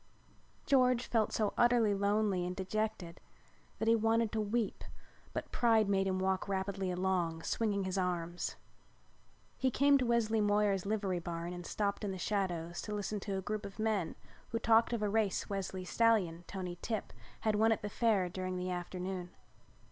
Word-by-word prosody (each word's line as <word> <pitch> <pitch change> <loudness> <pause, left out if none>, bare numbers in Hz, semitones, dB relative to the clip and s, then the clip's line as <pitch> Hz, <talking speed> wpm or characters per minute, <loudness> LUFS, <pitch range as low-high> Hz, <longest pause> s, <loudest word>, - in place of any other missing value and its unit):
George 255 -2 +3
felt 225 -3 +1
so 215 -2 0
utterly 240 -3 +4
lonely 200 -1 +1
and 180 +1 -3
dejected 190 -3 -3 0.6
that 220 - -2
he 230 - +6
wanted 225 0 +2
to 220 - 0
weep 215 +1 -1 0.5
but - - -5
pride 225 -3 +3
made 195 -1 +2
him 190 -1 0
walk 190 +1 0
rapidly 195 -1 -2
along, 180 -3 0
swinging 205 -3 0
his 190 +1 -1
arms. 175 -1 -2 1.0
He 260 - +3
came 280 +2 +4
to 255 - +1
Wesley 225 -2 +2
Moyer's 205 -2 +2
livery 200 -4 0
barn 170 0 -4
and 175 -1 -7
stopped 200 0 -1
in 205 - -1
the 190 - -4
shadows 175 -4 -2
to 210 - -4
listen 205 0 -2
to 195 -1 -3
a 190 - -4
group 210 +2 -3
of 200 -1 -8
men 215 -6 0 0.3
who 230 - -1
talked 230 0 +4
of 230 -3 -1
a - - +2
race 205 -1 0
Wesley's 190 -2 -4
stallion, 190 -8 +2
Tony 180 -3 -5
Tip, 220 -2 -3 0.3
had 215 - +2
won 220 +2 +4
at 220 - 0
the - - -1
Fair 205 -4 +2
during 185 +1 -4
the 180 0 -2
afternoon. 180 0 -4
200 Hz, 175 wpm, -33 LUFS, 185-220 Hz, 1.0 s, he